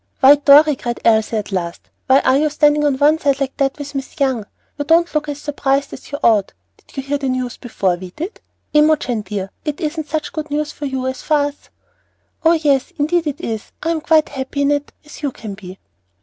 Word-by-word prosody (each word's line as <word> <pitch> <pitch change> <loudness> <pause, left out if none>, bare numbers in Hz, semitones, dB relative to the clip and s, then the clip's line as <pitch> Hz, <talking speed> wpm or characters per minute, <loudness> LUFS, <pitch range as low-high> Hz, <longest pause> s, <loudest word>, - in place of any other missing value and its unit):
"Why, 275 +1 +8
Dorry," 290 +1 +6
cried 240 -1 -4
Elsie 220 0 +3
at 210 -1 -4
last, 175 -3 -4 0.2
"why 265 +1 +5
are 260 - +3
you 305 +2 +2
standing 295 0 +3
on 280 -2 +2
one 300 +3 +4
side 280 -2 +1
like 270 -1 -2
that 270 0 0
with 285 -1 -7
Miss 270 +1 -6
Young? 260 -7 0 0.3
You 290 - -2
don't 335 +2 +3
look 300 -1 -1
as 290 0 -4
surprised 280 -1 -1
as - - -11
you 285 - -3
ought. 210 -4 +3 0.2
Did - - -22
you 270 - -2
hear 285 +1 -2
the 270 -1 -2
news 255 -1 -2
before 195 -7 -1
we 185 0 -8
did? 335 - -7 0.3
Imogen 300 -6 +3
dear, 195 -1 -5
it 300 -1 -3
isn't 310 -1 -3
such 310 0 -3
good 310 -1 -4
news 300 +1 -2
for 290 - -5
you 265 -1 -3
as 260 0 -3
for 310 - +1
us." 290 0 -2 0.7
"Oh, 330 +1 +5
yes, 290 -3 +1
indeed 320 +2 +1
it 290 -1 -4
is. 220 -1 -5
I 330 - +1
am 325 -2 -1
quite 315 -1 +3
as - - -9
happy 265 +2 -2
in 280 - +2
it 290 0 -1
as 300 - -12
you 285 -2 -1
can 215 -4 -8
be." 190 -2 -10
285 Hz, 230 wpm, -18 LUFS, 255-300 Hz, 0.7 s, Why